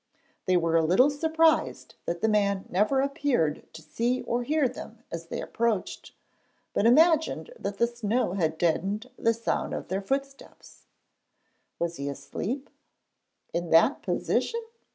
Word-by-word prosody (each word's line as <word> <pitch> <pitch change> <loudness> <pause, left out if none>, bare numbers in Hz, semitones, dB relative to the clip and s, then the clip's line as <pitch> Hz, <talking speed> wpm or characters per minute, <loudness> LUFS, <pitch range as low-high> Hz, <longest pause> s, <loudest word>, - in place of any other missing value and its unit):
They 185 -1 +4
were 165 -1 +1
a 165 - +3
little 190 - +4
surprised 320 +2 +1
that 170 0 -2
the 220 - +2
man 200 -2 +1
never 215 +9 +2
appeared 270 - 0
to 160 - -11
see 235 +10 -1
or 240 +1 -1
hear 295 +2 +1
them 230 -1 -10
as 165 0 -6
they - - -4
approached, 225 -5 -2 0.6
but 220 - +2
imagined 320 - +3
that 200 0 -4
the 235 - +4
snow 235 -3 -1
had 160 -5 0
deadened 195 +9 -1
the 230 -2 +1
sound 230 - -2
of - - -6
their 190 +1 -1
footsteps. 275 +5 -6 0.9
Was 170 0 -2
he 140 0 -3
asleep? 215 - -5 0.8
In 170 0 -2
that 170 - +4
position? 465 0 -1
220 Hz, 145 wpm, -27 LUFS, 175-270 Hz, 0.9 s, They